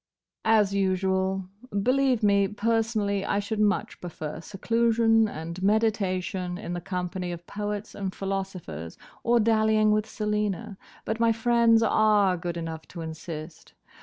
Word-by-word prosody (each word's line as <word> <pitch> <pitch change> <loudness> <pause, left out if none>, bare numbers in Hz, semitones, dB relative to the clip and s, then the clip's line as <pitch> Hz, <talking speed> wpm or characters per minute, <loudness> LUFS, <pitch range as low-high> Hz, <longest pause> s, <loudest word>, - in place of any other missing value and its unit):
"As 210 -3 +4
usual. 190 -1 0 0.4
Believe 255 -1 +2
me, 200 -1 +4
personally 210 -1 0
I - - 0
should 205 +1 -2
much 210 0 0
prefer 160 -3 -6
seclusion 225 +3 +2
and 170 -1 -6
meditation 190 -4 0
in 180 -3 -5
the 175 - -4
company 180 0 -3
of 175 0 -7
poets 210 +1 -4
and 195 -2 -3
philosophers, 185 - -5 0.2
or 235 0 +3
dallying 215 -1 +3
with 215 0 +1
Selina; 210 -1 -2 0.3
but 220 +1 -2
my 230 0 +4
friends 230 0 +4
are 210 -4 +4
good 170 0 -4
enough 165 -1 -6
to 170 - -8
insist. 160 0 -8
200 Hz, 135 wpm, -26 LUFS, 180-220 Hz, 0.4 s, As